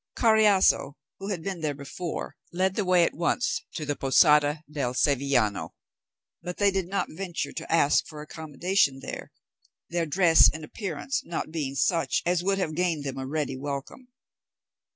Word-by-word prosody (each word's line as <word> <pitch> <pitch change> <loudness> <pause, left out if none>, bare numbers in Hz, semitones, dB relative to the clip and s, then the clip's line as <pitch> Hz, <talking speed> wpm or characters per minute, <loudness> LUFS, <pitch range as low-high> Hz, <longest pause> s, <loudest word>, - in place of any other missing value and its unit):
Carriazo, 215 - +4 0.3
who 195 +1 -6
had 180 -5 -3
been 190 -3 -4
there 150 -2 -2
before, 150 +5 -6 0.2
led 185 +2 0
the 205 - -1
way 180 -2 +4
at - - +1
once 175 +8 -1
to 155 - -4
the 145 0 -1
Posada 150 +2 +4
del 140 -4 -3
Sevillano; 130 -7 +1 0.7
but 180 0 -6
they 200 -1 +3
did 190 -2 -2
not 195 0 -2
venture 175 0 -4
to 165 - -6
ask 155 -3 +3
for 155 - -10
accommodation 155 -1 -1
there, - - -7 0.6
their 170 -1 -1
dress 165 +1 +6
and 160 - -8
appearance 200 - -4
not 165 -5 -5
being 145 -4 -3
such 165 +4 +1
as 175 0 +1
would 195 +1 +1
have 170 -5 -2
gained 165 -3 -1
them 135 -1 -5
a 130 - -5
ready 150 -2 -2
welcome. 140 - -6
165 Hz, 165 wpm, -26 LUFS, 145-185 Hz, 0.7 s, dress